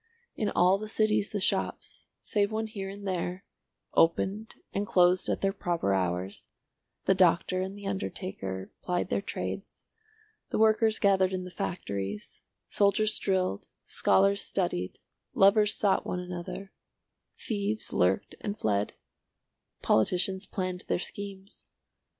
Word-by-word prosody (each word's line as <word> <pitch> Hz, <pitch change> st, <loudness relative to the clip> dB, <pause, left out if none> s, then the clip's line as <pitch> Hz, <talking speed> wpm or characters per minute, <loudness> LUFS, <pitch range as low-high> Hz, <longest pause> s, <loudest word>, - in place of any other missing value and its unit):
In 215 Hz, -, 0 dB
all 185 Hz, +2 st, +4 dB
the 215 Hz, 0 st, -6 dB
cities 215 Hz, -2 st, +2 dB
the 205 Hz, -, -2 dB
shops, 190 Hz, -, -1 dB
save 205 Hz, 0 st, +1 dB
one 220 Hz, +1 st, -1 dB
here 200 Hz, -3 st, -5 dB
and 200 Hz, +1 st, -7 dB
there, 180 Hz, +1 st, -2 dB, 0.5 s
opened 195 Hz, +6 st, +2 dB, 0.2 s
and 200 Hz, +1 st, -1 dB
closed 180 Hz, 0 st, +4 dB
at -, -, -1 dB
their 195 Hz, 0 st, +1 dB
proper 170 Hz, -, 0 dB
hours, 90 Hz, 0 st, -2 dB, 0.6 s
the 190 Hz, -, +5 dB
doctor 185 Hz, 0 st, +3 dB
and 190 Hz, +2 st, -4 dB
the 205 Hz, -, -10 dB
undertaker 185 Hz, -, -4 dB
plied 180 Hz, 0 st, -1 dB
their -, -, 0 dB
trades, -, -, -5 dB, 0.7 s
the -, -, -1 dB
workers 220 Hz, 0 st, +4 dB
gathered 190 Hz, -2 st, +3 dB
in 185 Hz, -1 st, -2 dB
the 180 Hz, -, -8 dB
factories, 100 Hz, -, -4 dB, 0.2 s
soldiers 210 Hz, +1 st, +2 dB
drilled, 185 Hz, -, 0 dB, 0.2 s
scholars 200 Hz, +1 st, +3 dB
studied, 95 Hz, -, -1 dB, 0.4 s
lovers 210 Hz, +2 st, +5 dB
sought 200 Hz, -2 st, +2 dB
one 180 Hz, -, -3 dB
another, 180 Hz, +2 st, -6 dB, 0.7 s
thieves 210 Hz, 0 st, -2 dB
lurked 90 Hz, +2 st, +2 dB
and 205 Hz, -1 st, -3 dB
fled, 105 Hz, -1 st, 0 dB, 0.9 s
politicians 185 Hz, -, +2 dB
planned 185 Hz, -2 st, -3 dB
their -, -, +1 dB
schemes. 195 Hz, +1 st, -6 dB
190 Hz, 130 wpm, -29 LUFS, 175-205 Hz, 0.9 s, the